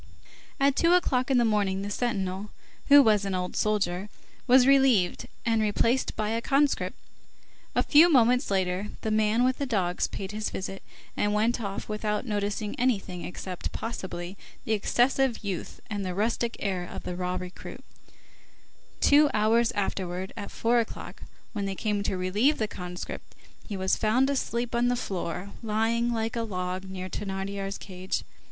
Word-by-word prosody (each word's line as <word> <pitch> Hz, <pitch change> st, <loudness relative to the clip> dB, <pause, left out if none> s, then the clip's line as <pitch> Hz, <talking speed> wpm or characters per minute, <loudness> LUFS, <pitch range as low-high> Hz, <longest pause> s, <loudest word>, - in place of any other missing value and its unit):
At 275 Hz, 0 st, +3 dB
two 335 Hz, +3 st, +4 dB
o'clock 260 Hz, -8 st, +2 dB
in 265 Hz, -, +4 dB
the 240 Hz, -, +4 dB
morning, 200 Hz, -3 st, +1 dB
the 205 Hz, -, -4 dB
sentinel, 200 Hz, -4 st, -2 dB, 0.4 s
who 285 Hz, 0 st, +9 dB
was 210 Hz, -4 st, +4 dB
an 195 Hz, -1 st, -2 dB
old 180 Hz, 0 st, -3 dB
soldier, 200 Hz, -2 st, 0 dB, 0.4 s
was 255 Hz, 0 st, +7 dB
relieved, 265 Hz, -9 st, +4 dB, 0.2 s
and 225 Hz, -1 st, +2 dB
replaced 230 Hz, +4 st, +1 dB
by 215 Hz, -1 st, -1 dB
a 225 Hz, +1 st, -1 dB
conscript. 280 Hz, +3 st, +1 dB, 0.8 s
A -, -, +3 dB
few 315 Hz, +4 st, +7 dB
moments 250 Hz, -1 st, +4 dB
later, 190 Hz, 0 st, 0 dB
the 220 Hz, -, -2 dB
man 215 Hz, +2 st, +3 dB
with 255 Hz, 0 st, +1 dB
the 280 Hz, -, -1 dB
dogs 185 Hz, -7 st, 0 dB
paid 195 Hz, 0 st, -6 dB
his 215 Hz, 0 st, -2 dB
visit, 195 Hz, 0 st, -5 dB, 0.3 s
and 205 Hz, 0 st, +1 dB
went 230 Hz, +3 st, +1 dB
off 200 Hz, -2 st, -4 dB
without 210 Hz, +1 st, -2 dB
noticing 205 Hz, -1 st, -2 dB
anything, 200 Hz, -8 st, 0 dB
except, 180 Hz, 0 st, -5 dB
possibly, 190 Hz, -4 st, -5 dB, 0.3 s
the -, -, -3 dB
excessive 245 Hz, +3 st, +1 dB
youth 195 Hz, -4 st, -4 dB
and 205 Hz, -2 st, -3 dB
"the 185 Hz, -1 st, -3 dB
rustic 230 Hz, +3 st, 0 dB
air" 190 Hz, -3 st, -1 dB
of -, -, -7 dB
the 180 Hz, -, -4 dB
"raw 180 Hz, 0 st, -2 dB
recruit." 180 Hz, 0 st, -7 dB, 1.2 s
Two 290 Hz, +1 st, +6 dB
hours 225 Hz, +2 st, +3 dB
afterwards, 190 Hz, -2 st, -3 dB
at 205 Hz, -3 st, -6 dB
four 235 Hz, +1 st, +2 dB
o'clock, 225 Hz, -, -5 dB, 0.3 s
when 205 Hz, -3 st, -2 dB
they 195 Hz, 0 st, -3 dB
came 210 Hz, 0 st, -1 dB
to 195 Hz, -2 st, -1 dB
relieve 205 Hz, +11 st, +2 dB
the 215 Hz, -, 0 dB
conscript, 180 Hz, -2 st, -7 dB, 0.3 s
he 205 Hz, -, -4 dB
was 190 Hz, 0 st, +1 dB
found 250 Hz, +6 st, +2 dB
asleep 240 Hz, -3 st, -2 dB
on 240 Hz, +1 st, +2 dB
the 245 Hz, -, +2 dB
floor, 190 Hz, -4 st, -4 dB
lying 230 Hz, +2 st, +1 dB
like 225 Hz, 0 st, -2 dB
a 230 Hz, -, 0 dB
log 185 Hz, -3 st, -3 dB
near 185 Hz, -1 st, -6 dB
Thénardier's 195 Hz, 0 st, -4 dB
cage. 185 Hz, -1 st, -4 dB
210 Hz, 165 wpm, -27 LUFS, 190-235 Hz, 1.2 s, who